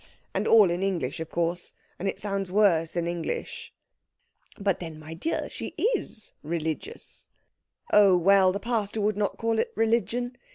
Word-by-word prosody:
And - - -1
all 210 -6 +7
in 175 +1 -2
English, 170 -9 -1
of 160 0 -5
course, 170 +1 -2 0.2
and 195 - -2
it - - -2
sounds 195 -2 -2
worse 180 -6 +3
in 170 -1 0
English." 170 -1 -4 0.9
"But 195 -3 0
then, 165 -3 -7
my 155 +1 -9
dear, 310 - -2
she - - -7 0.2
is 215 - -4
religious?" 160 - -5 0.6
"Oh, 200 -3 +7
well, 190 +1 +5
the 200 - -3
pastor 220 -2 -1
would 210 0 +1
not 205 -1 -1
call 225 -1 0
it - - 0
religion. 235 +2 0
195 Hz, 160 wpm, -27 LUFS, 170-215 Hz, 0.9 s, all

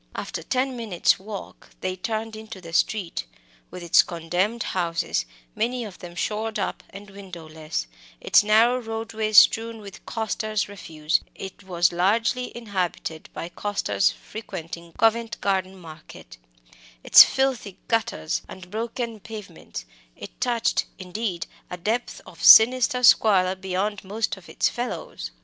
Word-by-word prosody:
After - - -5
ten 260 0 -1
minutes' 220 -7 +1
walking 200 +1 -9
they 185 0 -2
turned 220 +3 -4
into 220 -2 -9
the 165 -2 -11
street. 185 0 0 0.4
With 180 - -9
its 170 - +6
condemned 180 +7 -2
houses, 170 - -1 0.3
many 240 +2 -1
of 205 -4 -9
them 175 -1 -10
shored 215 +4 -2
up - - -3
and 200 +1 -11
windowless, 160 - -6 0.3
its 220 - +4
narrow 225 +4 +4
roadway 225 -1 -4
strewn 225 +2 +6
with 200 -3 -11
costers' 215 -2 -2
refuse 165 -5 -2
it 190 0 -9
was 175 -2 +2
largely 225 +8 +1
inhabited 185 -7 -4
by 170 - -5
costers 205 +1 0
frequenting 170 -5 -8
Covent 225 +2 +1
Garden 190 -1 -1
Market 155 - -13 0.7
its - - +10
filthy 260 -8 -1
gutters 225 -7 -1
and 185 -1 -11
broken 230 +1 -4
pavements, 200 - -9 0.3
it - - -11
touched, 240 -2 +1
indeed, 185 -1 -4 0.2
a 180 - -6
depth 220 +7 -2
of - - -12
sinister 250 +2 +7
squalor 190 -6 +5
beyond 190 +2 -3
most 215 +3 -2
of 190 -3 -16
its - - +1
fellows. 250 - -5
205 Hz, 130 wpm, -24 LUFS, 180-225 Hz, 0.7 s, its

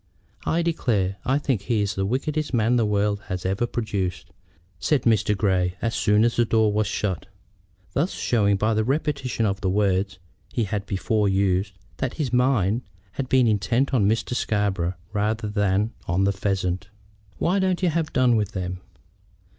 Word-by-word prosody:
"I 170 +1 +2
declare 105 - 0
I 135 +2 +2
think 135 -8 -1
he 105 0 0
is 100 0 -1
the 95 -1 -1
wickedest 150 +4 -1
man 115 +2 +3
the 115 -3 +2
world 105 0 +1
has 95 -3 -4
ever 95 +6 0
produced," 100 -7 -3 0.5
said 145 -5 +1
Mr. 110 -3 +2
Grey 95 -2 +1
as 115 0 -1
soon 105 0 +3
as 115 0 +1
the 120 - +5
door 110 -2 +2
was 105 0 +1
shut, 95 -4 -2 0.7
thus 165 +7 +1
showing 100 -4 +1
by 110 +3 +1
the 110 0 +1
repetition 135 -2 -1
of 100 -1 -1
the 95 - 0
words 95 0 +1 0.3
he 115 - 0
had 100 -1 -3
before 105 +2 +1
used 95 0 +1 0.2
that 130 - -2
his 140 -6 -2
mind 125 -4 +2 0.3
had 130 -2 -4
been 130 -2 +4
intent 110 +6 +1
on 105 -6 +3
Mr. 110 +2 0
Scarborough 100 -6 0 0.2
rather 105 +1 0
than 105 +1 +1
on 90 +3 +1
the 100 0 +2
pheasant. 95 -1 -2 0.5
"Why 185 +4 +1
don't 185 -1 0
you 180 - +4
have 160 -1 -1
done 125 -2 +3
with 105 -2 0
them?" 90 -1 -4
105 Hz, 175 wpm, -24 LUFS, 95-125 Hz, 0.7 s, the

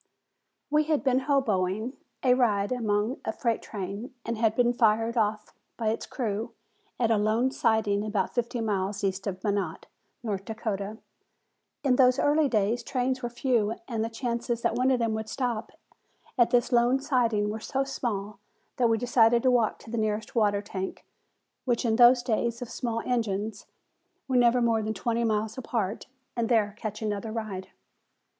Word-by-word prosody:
We 300 +1 +3
had 310 -2 +1
been 260 -1 +2
"hoboing" 220 -4 +1 0.3
a 250 -2 +5
ride 210 -5 +2
upon 220 0 0
a - - -1
freight 230 0 -1
train 205 +6 -6
and 230 - -2
had 220 -1 +1
been 245 0 +3
fired 225 0 +2
off 215 -1 0 0.2
by 225 -2 0
its 225 - -3
crew 225 -2 -3 0.4
at 230 -2 +2
a 225 - +4
lone 220 +5 +2
siding 220 -6 +1
about 210 -3 -1
fifty 240 0 -1
miles 200 -1 -1
east 195 +1 -1
of 185 -1 -4
Minot, 200 -6 -1 0.4
North 200 -4 -2
Dakota. 215 -1 -4 0.9
In 260 -3 +3
those 255 -1 +5
early 295 0 +3
days 220 +1 +1
trains 255 +1 -1
were 240 - -2
few 235 -3 0
and 225 -3 -2
the 225 - -2
chances 235 0 -3
that - - +2
one 255 +1 +2
of 260 - +3
them 230 -2 0
would 220 0 -4
stop 240 -4 -2 0.6
at 240 -2 +4
this 245 +1 +2
lone 240 +2 +4
siding 235 -7 +1
were 220 - -4
so 270 +5 -1
small 215 -7 -4 0.4
that 240 -2 +3
we 225 - +3
decided 235 0 +3
to 255 - +4
walk 235 -3 +2
to 225 - -13
the 235 - -1
nearest 215 0 -2
water 205 -3 +2
tank, 190 -2 -5 0.6
which 245 -1 0
in 220 -1 +2
those 245 0 +7
days 235 -1 0
of 240 - -10
small 230 -2 -2
engines 215 -3 -2 0.6
were 260 - -1
never 245 0 +4
more 230 -1 +2
than 220 +1 -3
twenty 235 +4 -1
miles 220 +1 -1
apart, 225 -5 -3 0.3
and 235 -2 -1
there 215 -4 +2
catch 215 -1 -5
another 210 +1 -2
ride. 215 -4 -5
225 Hz, 175 wpm, -27 LUFS, 210-245 Hz, 0.9 s, those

